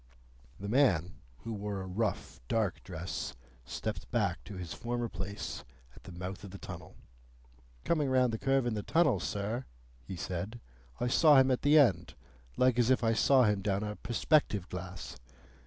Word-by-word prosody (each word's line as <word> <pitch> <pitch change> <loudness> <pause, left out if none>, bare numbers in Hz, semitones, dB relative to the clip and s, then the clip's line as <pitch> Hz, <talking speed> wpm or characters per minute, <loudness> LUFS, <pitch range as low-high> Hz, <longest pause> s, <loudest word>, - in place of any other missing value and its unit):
The 100 - -5
man, 100 - +2 0.2
who 115 - -4
wore 100 -1 -4
a - - -5
rough 105 +4 -2
dark 110 - 0
dress, 90 0 -5 0.3
stepped 105 - -5
back 100 -7 0
to 100 - -8
his 90 -3 -6
former 120 0 -2
place 95 +1 -5 0.3
at - - -17
the 95 - -9
mouth 90 +2 -6
of 100 - -8
the 100 - -9
tunnel. - - -9 0.9
"Coming 150 -5 +1
round 130 -2 +3
the 110 - -2
curve 135 -1 +2
in 120 - 0
the 105 - -2
tunnel, 160 - +3
sir," 105 +5 -3 0.4
he 95 - -7
said, 95 +6 -4 0.4
"I 120 - 0
saw 145 +4 +6
him 130 0 +5
at 125 - +1
the 145 +2 +5
end, 130 -10 +3 0.4
like 125 -1 +3
as 120 0 +3
if 130 -2 +3
I 115 0 +3
saw 130 +3 +5
him 105 -3 +2
down 100 +1 0
a 105 0 -3
perspective 120 - +1
glass. 90 0 -7
110 Hz, 175 wpm, -32 LUFS, 95-125 Hz, 0.9 s, saw